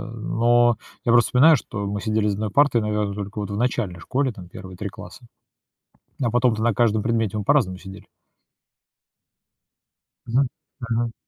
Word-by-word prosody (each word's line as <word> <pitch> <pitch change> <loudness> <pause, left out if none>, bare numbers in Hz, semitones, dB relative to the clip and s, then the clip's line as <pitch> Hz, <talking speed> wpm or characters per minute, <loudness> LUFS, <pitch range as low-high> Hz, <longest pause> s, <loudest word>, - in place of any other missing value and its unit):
Но 120 +1 +1 0.3
я 120 - +2
просто 120 -1 +5
вспоминаю, 150 +5 +6
что 100 -6 -5
мы 100 +1 -3
сидели 110 0 0
за 100 - 0
одной 110 0 -3
партой, 140 -2 +3
наверно, 105 -1 -1
только 100 +1 -6
в 100 0 -4
начальной 110 -7 -1
школе, 130 +6 -1
там 90 -5 -12
первые 95 0 -10
3 - - -4
класса, - - -12 1.0
а 120 - +1
потом-то 120 -2 +1
на 115 -2 +2
каждом 110 -1 +2
предмете 115 -2 -1
мы 105 - -3
по-разному 105 -9 +2
сидели. 95 +1 -12 2.2
Мгм, 125 +4 +2 0.4
мгм. 115 0 -1
110 Hz, 155 wpm, -23 LUFS, 100-120 Hz, 2.2 s, вспоминаю